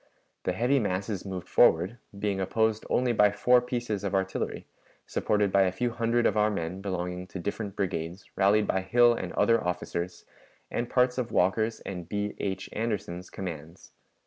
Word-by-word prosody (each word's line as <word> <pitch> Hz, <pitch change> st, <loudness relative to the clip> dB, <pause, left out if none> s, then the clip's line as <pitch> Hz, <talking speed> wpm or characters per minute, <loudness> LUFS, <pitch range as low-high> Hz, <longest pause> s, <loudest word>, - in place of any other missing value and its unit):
The 90 Hz, -, +1 dB
heavy 125 Hz, +8 st, +2 dB
masses 100 Hz, -1 st, -2 dB
moved 95 Hz, -2 st, -5 dB
forward, 90 Hz, +9 st, +4 dB, 0.2 s
being 100 Hz, -1 st, -1 dB
opposed 110 Hz, +3 st, 0 dB
only 125 Hz, -1 st, +2 dB
by 105 Hz, -2 st, +5 dB
four 125 Hz, +4 st, +4 dB
pieces 120 Hz, -5 st, -3 dB
of 100 Hz, 0 st, -1 dB
artillery, 95 Hz, 0 st, -2 dB, 0.4 s
supported 105 Hz, -2 st, +1 dB
by 100 Hz, -, +4 dB
a 95 Hz, -1 st, +3 dB
few 120 Hz, +6 st, -1 dB
hundred 115 Hz, 0 st, +1 dB
of -, -, +3 dB
our 105 Hz, 0 st, +3 dB
men 90 Hz, -2 st, -3 dB
belonging 90 Hz, -2 st, -3 dB
to 95 Hz, -, -7 dB
different 100 Hz, +2 st, -4 dB
brigades 90 Hz, -2 st, -3 dB
rallied 105 Hz, +2 st, +4 dB
by 95 Hz, -, 0 dB
Hill 120 Hz, +5 st, +5 dB
and -, -, -4 dB
other 115 Hz, -1 st, +3 dB
officers, 90 Hz, 0 st, -3 dB, 0.5 s
and 120 Hz, 0 st, -2 dB
parts 125 Hz, 0 st, +2 dB
of 120 Hz, -2 st, -3 dB
Walker's 110 Hz, +5 st, +1 dB
and 90 Hz, -4 st, -7 dB
B. 105 Hz, 0 st, -2 dB
H. 95 Hz, -1 st, -3 dB
Anderson's 105 Hz, -5 st, -3 dB
commands. 85 Hz, -2 st, -8 dB
100 Hz, 170 wpm, -28 LUFS, 95-115 Hz, 0.5 s, by